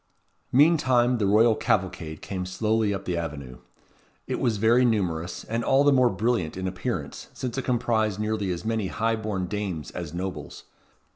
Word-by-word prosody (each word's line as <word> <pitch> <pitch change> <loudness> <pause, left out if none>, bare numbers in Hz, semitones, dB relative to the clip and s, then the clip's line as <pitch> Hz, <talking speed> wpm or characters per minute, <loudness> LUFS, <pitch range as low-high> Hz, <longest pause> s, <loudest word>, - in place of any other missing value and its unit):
Meantime 130 -4 +4
the 100 - +1
royal 110 +3 +5
cavalcade 95 -9 -2
came 95 -2 -4
slowly 110 +3 0
up 95 -1 -4
the 90 - -1
avenue. 70 -7 -5 0.7
It - - -3
was 115 -4 +1
very 115 +4 +4
numerous, 85 -7 -1
and 115 +1 -2
all 135 +3 +4
the 145 -1 +5
more 130 -2 +4
brilliant 100 -5 -1
in 95 0 -3
appearance, 90 0 -4
since 125 -2 -4
it 135 - -3
comprised 110 -4 0
nearly 105 -2 -1
as 90 +3 -4
many 110 -3 -1
high 115 +3 0
born 105 -4 -3
dames 90 - -4
as 85 -4 -6
nobles. 90 +2 -6
105 Hz, 165 wpm, -26 LUFS, 90-115 Hz, 0.7 s, royal